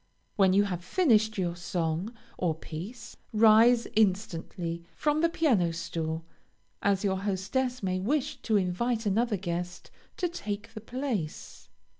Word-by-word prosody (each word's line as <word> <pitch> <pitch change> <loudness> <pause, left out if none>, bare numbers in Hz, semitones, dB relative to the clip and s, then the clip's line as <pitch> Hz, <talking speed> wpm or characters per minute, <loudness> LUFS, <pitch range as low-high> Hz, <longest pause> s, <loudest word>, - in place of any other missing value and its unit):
When 195 -2 +5
you 200 +1 +5
have 180 -4 -3
finished 220 - +3
your 175 -2 -1
song 175 +2 -2 0.2
or 170 -3 0
piece, 200 +10 -8
rise 225 +2 +6
instantly 180 -4 0
from 300 0 +1
the 335 - +4
piano 240 - +2
stool, 165 -1 -4 0.6
as 200 -1 +2
your 190 -2 +1
hostess 210 +6 -1
may 185 -1 0
wish 255 +8 0
to 220 -2 +2
invite 220 +5 0
another 215 +2 +1
guest 175 -1 -5 0.3
to 360 - +1
take 225 - -5
the 215 - -7
place. 235 - -4
200 Hz, 135 wpm, -29 LUFS, 175-235 Hz, 0.6 s, rise